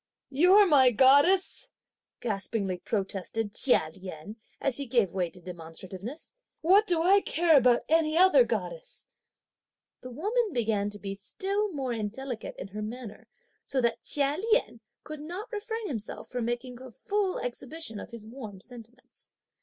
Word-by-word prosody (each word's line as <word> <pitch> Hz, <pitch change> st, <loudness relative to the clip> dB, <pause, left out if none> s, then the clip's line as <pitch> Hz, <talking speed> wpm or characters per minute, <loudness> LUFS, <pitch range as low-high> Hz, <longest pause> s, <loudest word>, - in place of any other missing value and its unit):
"You're 365 Hz, +9 st, +6 dB
my 280 Hz, -7 st, +6 dB
goddess!" 285 Hz, -, +4 dB, 0.5 s
gaspingly 200 Hz, -3 st, -2 dB
protested 200 Hz, +1 st, -3 dB
Chia 225 Hz, -11 st, +3 dB
Lien, 185 Hz, +3 st, -9 dB, 0.2 s
as 275 Hz, -3 st, -1 dB
he 280 Hz, -1 st, -4 dB
gave 230 Hz, -7 st, +2 dB
way 180 Hz, -3 st, -1 dB
to 180 Hz, -, -15 dB
demonstrativeness; 180 Hz, -, -9 dB, 0.3 s
"what 390 Hz, +6 st, +5 dB
do 335 Hz, -2 st, +2 dB
I 395 Hz, +3 st, +5 dB
care 335 Hz, -3 st, +3 dB
about 245 Hz, -3 st, +5 dB
any 320 Hz, 0 st, +2 dB
other 375 Hz, +7 st, +7 dB
goddess!" -, -, -4 dB, 0.9 s
The 255 Hz, -, -9 dB
woman 415 Hz, -, -1 dB
began 215 Hz, -4 st, 0 dB
to 205 Hz, -, -9 dB
be 200 Hz, -1 st, -5 dB
still 390 Hz, -, -2 dB
more 270 Hz, -6 st, -3 dB
indelicate 230 Hz, +3 st, -5 dB
in -, -, -8 dB
her 210 Hz, +2 st, -6 dB
manner, 220 Hz, 0 st, -7 dB, 0.4 s
so 270 Hz, -, -1 dB
that 235 Hz, -2 st, 0 dB
Chia 285 Hz, +2 st, 0 dB
Lien 475 Hz, -, +2 dB, 0.2 s
could 305 Hz, -1 st, -8 dB
not 360 Hz, +10 st, -7 dB
refrain 445 Hz, 0 st, -4 dB
himself 220 Hz, -, -5 dB
from 245 Hz, -2 st, -3 dB
making 240 Hz, +1 st, -4 dB
a 260 Hz, -, -9 dB
full 395 Hz, -, -2 dB
exhibition 250 Hz, -1 st, -5 dB
of -, -, -8 dB
his 230 Hz, -3 st, -10 dB
warm 220 Hz, -4 st, -9 dB
sentiments. 240 Hz, +3 st, -13 dB
255 Hz, 150 wpm, -28 LUFS, 210-335 Hz, 0.9 s, other